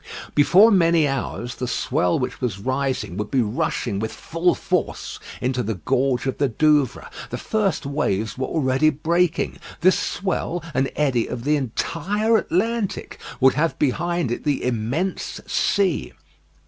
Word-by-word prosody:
Before 190 +10 +6
many 170 -5 +4
hours, 125 -2 -3
the 125 - -4
swell 90 -6 +1
which 125 - -4
was 120 -7 -1
rising 130 -3 -2
would 105 0 -3
be 130 -3 +2
rushing 105 -1 -1
with 110 +1 -2
full 170 +2 0
force - - -2 0.2
into 125 0 0
the 110 -2 -2
gorge 130 +6 0
of 135 - -2
the 140 -2 +2
Douvres. 150 +1 +2 0.2
The - - -4
first 210 -8 -1
waves 110 -7 -1
were 130 - -2
already 135 0 +2
breaking. 165 +3 0 0.2
This 185 +2 +4
swell, 180 -3 -2
and 135 +1 +1
eddy 130 -6 +1
of 120 - -5
the 150 +3 +2
entire 175 - 0
Atlantic, 215 +2 -1 0.2
would 130 -1 +5
have 160 +2 0
behind 170 +1 0
it 120 - -3
the 145 -2 0
immense 125 - -2
sea. 195 -5 0
140 Hz, 150 wpm, -22 LUFS, 125-170 Hz, 0.2 s, Before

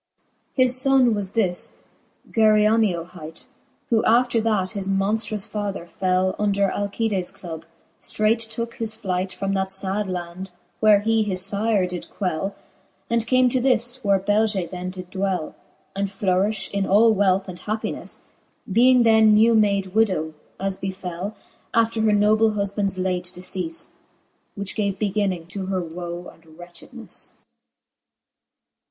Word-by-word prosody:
XI. 260 - +2
His 255 - +3
fbnne 265 -3 +4
was 200 -2 -3
this, 190 -6 +1 0.6
Geryoneo 215 -4 +3
hight, 165 -3 -10 0.5
Who 225 -2 +3
after 235 0 +3
that 210 -4 0
his 195 -3 -3
monftrous 205 +1 -1
father 205 -4 -4
fell 185 +1 0
Under 200 -1 +2
Alctdes 200 -2 -2
club, 165 -2 -9 0.3
ftreight 225 +1 0
tooke 230 +1 -4
his 220 -1 -2
flight 190 -3 -2
From 195 +1 -3
that 190 -1 -1
fad 195 +1 -1
land, 180 +1 -5 0.3
where 210 -2 +5
he 225 +1 +2
his 190 -3 +2
fyre 205 -1 +1
did 180 -1 -6
quell, 195 0 -3 0.6
And 230 -1 +1
came 255 +1 +4
to 255 +1 0
this, 245 0 +1
where 200 -1 +3
Beige 205 -2 0
then 180 0 -5
did 185 -1 -9
dwell, 190 -4 -2 0.4
And 200 0 0
flourifli 195 +1 0
in 200 -1 -1
all 220 +3 +5
wealth 195 -1 +2
and 180 -1 -8
happinelTe, 215 +1 -5 0.5
Being 245 +4 +5
then 220 -2 +6
new 225 +2 +5
made 200 -3 +2
widow, 185 -8 +1 0.3
as 195 0 -2
befell, 190 +1 -5 0.4
After 230 -1 +2
her 220 -1 +3
noble 215 +1 +3
huflDands 200 -1 -1
late 185 -1 -1
decefle; 185 - -5 0.7
Which 200 -1 -4
gave 200 -3 -1
beginning 195 -4 -1
to 190 +1 -5
her 190 -1 -1
woe 175 +1 -6
and 165 - -24
wretchedneflie. 175 -1 -9
200 Hz, 140 wpm, -23 LUFS, 185-220 Hz, 0.7 s, then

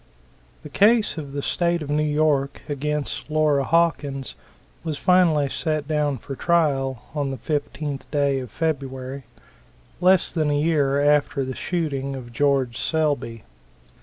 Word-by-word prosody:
The 150 - -9
case 210 +6 +3
of 145 -3 -7
the 140 0 -3
State 170 -2 0
of 145 - -5
New 150 +1 +2
York 150 -2 +1
against 150 0 -3
Laura 150 -2 +2
Hawkins 145 -4 0 0.5
was 155 -3 -3
finally 170 -6 +3
set 155 +1 -2
down 150 -3 0
for 135 +3 -7
trial 135 -7 +1
on 145 -2 -1
the 135 - -4
15th 145 -1 -4
day 140 -2 +1
of 125 -2 -7
February, 135 -4 -3 0.7
less 185 0 +3
than 155 -3 +1
a 145 - +1
year 145 -3 +2
after 145 -2 +2
the 130 - -4
shooting 140 -6 -2
of 120 -2 -9
George 135 -3 +1
Selby. 145 -8 -1
145 Hz, 140 wpm, -23 LUFS, 135-155 Hz, 0.7 s, case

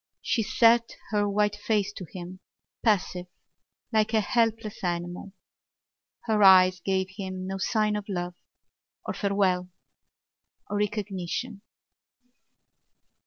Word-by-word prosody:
She 230 - +1
set 230 +2 +3 0.2
her 205 -1 +1
white 210 0 +1
face 210 -1 -1
to 190 - -7
him, 185 0 -8 0.4
passive, 185 -5 +1 0.7
like 220 +1 +2
a - - +5
helpless 225 -1 0
animal. 175 +2 -3 0.9
Her 220 -2 0
eyes 185 -1 +7
gave 190 +1 -1
him 185 -2 -5
no 195 +1 -4
sign 215 +1 +1
of 210 0 -5
love 175 -2 -3 0.7
or - - -3
farewell 190 -3 0 1.0
or 205 - 0
recognition. 205 +1 -3
200 Hz, 110 wpm, -27 LUFS, 185-215 Hz, 1.0 s, eyes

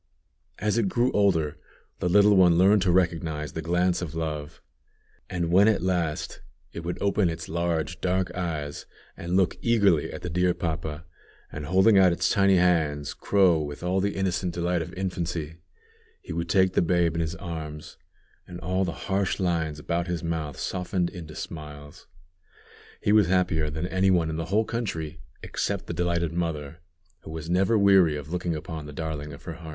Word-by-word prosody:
As 105 +2 0
it 100 -4 +1
grew 120 +5 +1
older, 80 -7 +1 0.4
the 90 - 0
little 105 +2 +6
one 90 -3 +5
learned 100 +3 +5
to 90 -1 +2
recognize 80 -5 0
the 80 - -4
glance 90 +2 +1
of 80 -3 -5
love; 75 -3 -4 0.7
and 85 -2 -2
when 100 +4 +6
at 105 -5 +2
last 85 -4 -1 0.3
it - - -5
would 85 +1 -4
open 100 -2 +2
its 80 0 -5
large 85 +1 -2
dark 95 0 0
eyes 80 -5 -4 0.3
and 90 +2 -2
look 95 -2 +2
eagerly 100 -9 +3
at - - -8
the 90 - -3
dear 90 +1 +2
papa, 80 -1 -4 0.5
and, 75 -1 -6
holding 95 +4 +5
out 95 -2 +6
its 85 - +1
tiny 100 -3 +4
hands, 80 -5 +1
crow 95 -5 +3
with 75 +2 -6
all 90 +2 +1
the 100 +1 -1
innocent 90 -2 -1
delight 90 0 0
of 80 - -6
infancy, 85 -4 -3 0.6
he - - -8
would 85 0 -3
take 95 0 +3
the - - +3
babe 85 -1 +2
in 85 - -1
his 80 0 -2
arms, 80 -4 -7 0.5
and 90 - -8
all 95 +2 0
the 85 -3 -4
harsh 95 0 0
lines 85 -5 0
about 85 +3 -2
his 85 -1 -3
mouth 80 -4 -3
softened 90 -1 -2
into 80 -4 -9
smiles. 75 -2 -9 0.9
He 105 - +1
was 105 -3 +5
happier 85 -4 +1
than 80 +3 -3
any 95 +1 +1
one 85 -4 +2
in 80 - -4
the 80 - -3
whole 105 +5 +1
country, 85 -10 -4 0.2
except - - -2
the - - -5
delighted 85 -2 0
mother, 80 -2 -3 0.4
who - - -12
was 80 +1 -5
never 95 +5 +3
weary 95 -6 +5
of 75 0 -8
looking 90 -2 -2
upon 80 0 -6
the 75 - -9
darling 75 -1 -4
of 70 - -11
her 85 - -6
heart. 80 0 -10
85 Hz, 185 wpm, -26 LUFS, 80-95 Hz, 0.9 s, little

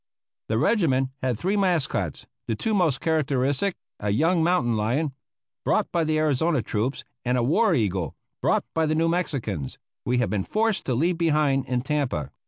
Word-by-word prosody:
The 110 - +1
regiment 135 - +2
had 125 -3 0
three 190 - 0
mascots; 180 -7 0 0.2
the 115 - 0
two 220 - -1
most 175 -9 +2
characteristic 145 +2 +1 0.2
a 105 - -2
young 160 - +2
mountain 130 -10 +2
lion 130 +8 0 0.5
brought - - +1
by 170 - +1
the 155 0 +1
Arizona 155 -2 +1
troops, 115 +7 -2 0.2
and 125 0 +1
a 120 - +1
war 175 - +3
eagle 95 - -1 0.3
brought - - +2
by 160 -1 +1
the 155 - +1
New 165 +1 +2
Mexicans 120 - -2 0.3
we 125 +1 0
had 125 -2 +1
been 100 -3 0
forced 220 - 0
to 125 - +1
leave 165 +6 +1
behind 150 -5 +2
in 125 -1 0
Tampa. 135 - -1
145 Hz, 175 wpm, -25 LUFS, 120-165 Hz, 0.5 s, war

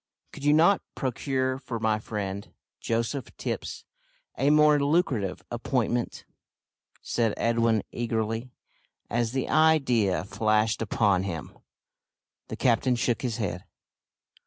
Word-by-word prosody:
"Could - - -10
you 145 +1 +4
not 170 +6 +5
procure 130 0 -1
for 120 -4 -5
my 110 -1 +1
friend, 100 -2 -5 0.3
Joseph 115 +4 -2
Tipps, - - -4 0.5
a 140 - +2
more 150 0 +5
lucrative 140 - 0
appointment?" 120 -1 -1 0.8
said 115 -3 0
Edwin 115 -2 +2
eagerly, 115 +1 -2 0.6
as 120 -1 0
the 130 -1 -1
idea 135 - +3
flashed 110 +2 +1
upon 100 -3 +2
him. 85 -5 -5 0.9
The - - -5
captain 125 +1 +2
shook 120 0 0
his 125 -3 -2
head. 95 -5 -3
115 Hz, 110 wpm, -27 LUFS, 110-130 Hz, 0.9 s, not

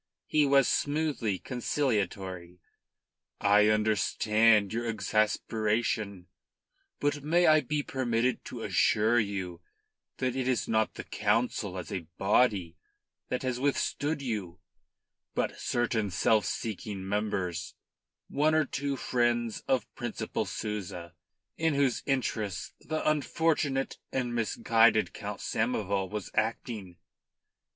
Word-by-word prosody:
He 150 -2 +3
was 135 -1 +5
smoothly 145 -9 0
conciliatory. 95 -9 -2 0.8
"I 105 +1 +5
understand 110 0 +3
your 120 +1 -2
exasperation. 110 -1 0 0.7
But 145 0 0
may 170 +5 +3
I 155 -1 +6
be 150 -1 -1
permitted 125 -2 0
to - - -6
assure 110 +3 +3
you 95 -5 -3 0.6
that 130 -1 -1
it 130 -1 -1
is 130 -2 +1
not 110 -1 +1
the - - -6
Council 110 -5 0
as 85 -4 -6
a 90 -5 -4
body 95 -4 +2 0.5
that 125 - -2
has 130 -1 -1
withstood 145 +2 0
you, 105 -9 -4 0.8
but - - -1
certain 115 -3 0
self 100 +3 +2
seeking 100 -3 -4
members, 95 -5 -2 0.5
one 155 +2 +2
or 155 -1 +3
two 140 0 -2
friends 120 -3 0
of 130 -1 +2
Principal 120 -3 -3
Souza, 90 -5 -5 0.5
in 160 -2 +2
whose 140 -3 +2
interests 110 -8 -1
the 155 0 -3
unfortunate 150 -2 +1
and 125 -2 -1
misguided 115 -1 +3
Count 105 -1 -6
Samoval 100 -4 -1
was 105 -2 -5
acting. 95 -7 -2
110 Hz, 110 wpm, -29 LUFS, 100-130 Hz, 0.8 s, I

